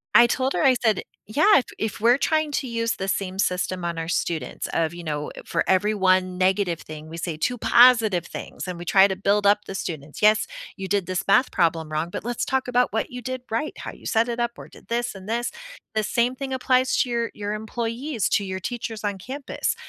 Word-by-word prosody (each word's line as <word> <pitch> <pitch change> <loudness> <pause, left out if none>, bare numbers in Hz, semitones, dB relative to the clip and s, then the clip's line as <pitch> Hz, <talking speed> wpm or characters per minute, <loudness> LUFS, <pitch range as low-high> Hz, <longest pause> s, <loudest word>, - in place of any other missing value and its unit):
I 240 0 +9
told 260 +2 0
her, - - 0
I 265 -3 +6
said 220 -5 +1 0.2
"Yeah, 310 - +5
if 260 - +1
if 220 -2 -3
we're 240 +3 +5
trying 310 -1 +1
to 265 - -1
use 230 -1 -1
the 190 - -4
same 195 -1 -2
system 180 -1 0
on 170 -1 -2
our 165 0 -3
students 170 -2 -2
of, 165 0 0
you 175 0 -8
know, 150 -2 -3
for - - 0
every 205 +3 +3
1 185 -1 +2
negative 185 -2 +1
thing, 155 0 -9
we 165 - -7
say 170 -1 -3
2 245 +10 -1
positive 235 -7 +5
things - - -7
and 180 -1 -4
we 175 - -8
try 195 +2 +6
to 190 - -2
build 200 +1 +2
up 205 +1 +5
the 195 - -6
students. 155 -4 -6
'Yes, 215 +1 +5 0.3
you 195 -1 -5
did 200 -2 0
this 185 -1 -1
math 255 +6 +4
problem 165 -2 +1
wrong, 155 +2 -1
but - - -5
let's 240 0 -2
talk 265 -1 0
about 250 -2 +2
what 225 - -1
you 250 0 -7
did 255 +1 -4
right, 230 +8 -2
how - - -6
you - - -16
set 230 +1 +2
it 235 0 -3
up 235 0 0
or - - -10
did - - -17
this 235 -2 -2
and 190 +1 -10
this.' 235 +2 -1 0.4
The 215 - +2
same 235 +4 +1
thing 265 0 -4
applies 255 0 +2
to 250 - +2
your 235 -1 -1
your 205 0 -4
employees, 230 +3 -2
to 200 - +2
your 190 0 -4
teachers 225 +1 -5
on 205 -2 -1
campus. 265 +8 -3
210 Hz, 230 wpm, -24 LUFS, 185-240 Hz, 0.4 s, I